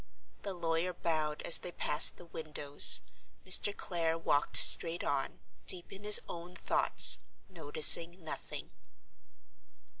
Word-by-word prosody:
The 195 Hz, -2 st, -11 dB
lawyer 170 Hz, +1 st, -7 dB
bowed 155 Hz, -3 st, -8 dB
as 170 Hz, -, +2 dB
they 180 Hz, -, -11 dB
passed 150 Hz, -2 st, -1 dB
the 175 Hz, -, -18 dB
windows; 150 Hz, -3 st, -1 dB, 0.4 s
Mr. 190 Hz, +2 st, +2 dB
Clare 165 Hz, -3 st, -7 dB
walked 145 Hz, -3 st, -2 dB
straight 170 Hz, 0 st, +6 dB
on, 135 Hz, -1 st, -9 dB, 0.3 s
deep 175 Hz, -1 st, -1 dB
in 195 Hz, +1 st, -14 dB
his 210 Hz, 0 st, +8 dB
own 175 Hz, +1 st, -15 dB
thoughts—noticing 165 Hz, 0 st, 0 dB
nothing. 160 Hz, -, -12 dB
165 Hz, 115 wpm, -27 LUFS, 155-180 Hz, 0.4 s, his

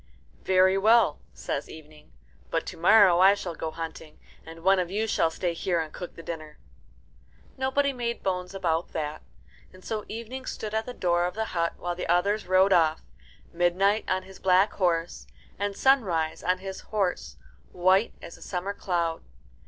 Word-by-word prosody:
"Very 190 Hz, +1 st, +3 dB
well," 215 Hz, -6 st, +4 dB
says 140 Hz, -, -5 dB
Evening; 155 Hz, -, -14 dB, 0.4 s
"but -, -, -1 dB
to -, -, -7 dB
morrow 185 Hz, 0 st, +6 dB
I 195 Hz, +2 st, +7 dB
shall 185 Hz, -4 st, -5 dB
go 160 Hz, 0 st, -4 dB
hunting, 160 Hz, -1 st, -8 dB, 0.3 s
and 165 Hz, +1 st, -12 dB
one 190 Hz, +1 st, +4 dB
of 180 Hz, -2 st, -1 dB
you 210 Hz, +4 st, -1 dB
shall 185 Hz, -6 st, +1 dB
stay 170 Hz, +1 st, -2 dB
here 170 Hz, +1 st, -1 dB
and 155 Hz, -1 st, -4 dB
cook 180 Hz, -, -8 dB
the 165 Hz, -, -10 dB
dinner." 155 Hz, -3 st, -7 dB, 1.0 s
Nobody 270 Hz, +2 st, 0 dB
made 235 Hz, -2 st, -4 dB
bones 180 Hz, 0 st, -2 dB
about 170 Hz, -3 st, -1 dB
that, 155 Hz, -1 st, -4 dB, 0.5 s
and 185 Hz, 0 st, -17 dB
so 215 Hz, -2 st, -3 dB
Evening 240 Hz, +4 st, -7 dB
stood 215 Hz, -1 st, -5 dB
at 220 Hz, +1 st, -1 dB
the 250 Hz, -, -6 dB
door 175 Hz, -1 st, +1 dB
of 180 Hz, -, -6 dB
the 220 Hz, 0 st, -1 dB
hut 170 Hz, -1 st, 0 dB
while 175 Hz, 0 st, -3 dB
the 175 Hz, -, -5 dB
others 200 Hz, +5 st, +1 dB
rode 190 Hz, +1 st, +4 dB
off 160 Hz, -2 st, +2 dB, 0.5 s
Midnight 185 Hz, +5 st, +2 dB
on 185 Hz, 0 st, 0 dB
his 190 Hz, 0 st, -14 dB
black 190 Hz, +2 st, +3 dB
horse, 170 Hz, -3 st, -1 dB, 0.3 s
and 200 Hz, 0 st, -2 dB
Sunrise 185 Hz, -13 st, +2 dB
on 185 Hz, 0 st, +1 dB
his 190 Hz, 0 st, -7 dB
horse, 185 Hz, -, -2 dB, 0.3 s
white 185 Hz, +5 st, +2 dB
as -, -, -9 dB
a -, -, -19 dB
summer 190 Hz, +2 st, -4 dB
cloud. 170 Hz, -5 st, -2 dB
185 Hz, 175 wpm, -27 LUFS, 170-205 Hz, 1.0 s, I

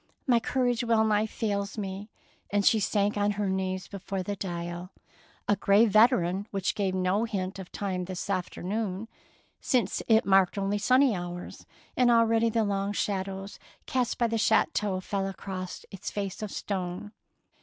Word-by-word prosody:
My 245 Hz, -3 st, +4 dB
courage 245 Hz, 0 st, 0 dB
wellnigh 220 Hz, -2 st, +3 dB
fails 205 Hz, -2 st, -2 dB
me 200 Hz, +1 st, -5 dB, 0.2 s
"; -, -, -36 dB
and 200 Hz, -1 st, +1 dB
she 220 Hz, -, +5 dB
sank 205 Hz, 0 st, +1 dB
on 205 Hz, 0 st, +2 dB
her 205 Hz, 0 st, -1 dB
knees 190 Hz, 0 st, -2 dB
before 195 Hz, -1 st, -4 dB
the 205 Hz, +2 st, -3 dB
dial, 175 Hz, -1 st, -5 dB, 0.3 s
— -, -, -31 dB
a 205 Hz, -, +4 dB
grey 200 Hz, +3 st, +4 dB
veteran 205 Hz, -3 st, +3 dB
which 195 Hz, -2 st, -1 dB
gave 195 Hz, -2 st, -1 dB
no 185 Hz, +4 st, +1 dB
hint 195 Hz, -3 st, -3 dB
of 185 Hz, -, -9 dB
time 185 Hz, -3 st, -3 dB
this 185 Hz, +1 st, -5 dB
afternoon, 195 Hz, +2 st, -2 dB, 0.5 s
since 250 Hz, -4 st, 0 dB
it 225 Hz, -1 st, +4 dB
marked 195 Hz, 0 st, +4 dB
only 200 Hz, +1 st, 0 dB
sunny 255 Hz, +2 st, +4 dB
hours, 175 Hz, 0 st, -7 dB, 0.3 s
and 250 Hz, -1 st, +4 dB
already 230 Hz, -1 st, +4 dB
the 225 Hz, 0 st, +1 dB
long 200 Hz, 0 st, -1 dB
shadows 195 Hz, -1 st, -3 dB, 0.3 s
cast 250 Hz, -2 st, 0 dB
by 240 Hz, -, +2 dB
the 230 Hz, -1 st, 0 dB
chateau 210 Hz, -3 st, +2 dB
fell 195 Hz, 0 st, -2 dB
across 185 Hz, -1 st, -6 dB
its 195 Hz, 0 st, -6 dB
face 200 Hz, -1 st, -4 dB
of 215 Hz, -, -3 dB
stone. 190 Hz, 0 st, -4 dB
200 Hz, 165 wpm, -28 LUFS, 190-220 Hz, 0.5 s, she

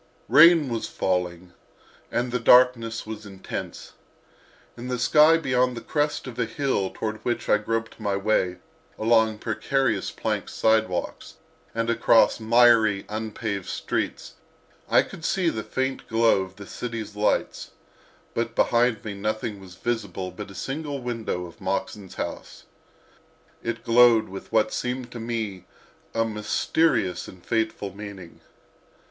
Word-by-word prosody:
Rain 165 Hz, 0 st, +7 dB
was 115 Hz, -3 st, -3 dB
falling, 90 Hz, -1 st, -2 dB, 0.6 s
and 120 Hz, +1 st, -1 dB
the 125 Hz, -, 0 dB
darkness 115 Hz, -1 st, +4 dB
was 110 Hz, -1 st, -7 dB
intense. 95 Hz, -1 st, -7 dB, 0.8 s
In 120 Hz, +1 st, -7 dB
the 125 Hz, 0 st, -2 dB
sky 150 Hz, +6 st, +5 dB
beyond 125 Hz, -5 st, +1 dB
the -, -, -5 dB
crest 150 Hz, 0 st, -1 dB
of 125 Hz, -3 st, -8 dB
a -, -, +2 dB
hill 115 Hz, -6 st, -1 dB
toward 110 Hz, +1 st, -4 dB
which 120 Hz, +2 st, -3 dB
I 105 Hz, -, +4 dB
groped 115 Hz, +2 st, -3 dB
my 105 Hz, -2 st, -1 dB
way 95 Hz, -3 st, +1 dB, 0.4 s
along 110 Hz, -1 st, +3 dB
precarious 125 Hz, +3 st, -1 dB
plank -, -, -3 dB
sidewalks 110 Hz, -5 st, 0 dB, 0.4 s
and 115 Hz, 0 st, 0 dB
across 115 Hz, 0 st, +4 dB
miry, 110 Hz, -3 st, +4 dB
unpaved 110 Hz, -2 st, -4 dB
streets -, -, -3 dB, 0.6 s
I -, -, +5 dB
could 160 Hz, -, -11 dB
see 185 Hz, 0 st, +1 dB
the 110 Hz, -, -4 dB
faint 130 Hz, +4 st, -3 dB
glow 115 Hz, -3 st, +3 dB
of 95 Hz, 0 st, -7 dB
the 100 Hz, 0 st, -10 dB
city's 115 Hz, -2 st, -6 dB
lights, 105 Hz, 0 st, 0 dB, 0.6 s
but 115 Hz, 0 st, -2 dB
behind 120 Hz, -2 st, +2 dB
me 105 Hz, -, -4 dB
nothing 105 Hz, +1 st, -3 dB
was 90 Hz, -2 st, -12 dB
visible 100 Hz, -5 st, -3 dB
but 100 Hz, +3 st, -8 dB
a 95 Hz, -, -12 dB
single 145 Hz, -, -4 dB
window 115 Hz, -7 st, -3 dB
of 85 Hz, -, -14 dB
Moxon's 100 Hz, -3 st, -3 dB
house. -, -, -6 dB, 1.0 s
It 115 Hz, 0 st, -4 dB
glowed 115 Hz, -2 st, +5 dB
with 95 Hz, +1 st, -9 dB
what 110 Hz, -1 st, +2 dB
seemed 125 Hz, 0 st, -3 dB
to 120 Hz, -, -7 dB
me 110 Hz, -5 st, -4 dB, 0.5 s
a 115 Hz, 0 st, +2 dB
mysterious 105 Hz, -, 0 dB
and 90 Hz, -1 st, -14 dB
fateful 110 Hz, -3 st, -2 dB
meaning. 100 Hz, -4 st, -10 dB
115 Hz, 140 wpm, -25 LUFS, 100-120 Hz, 1.0 s, Rain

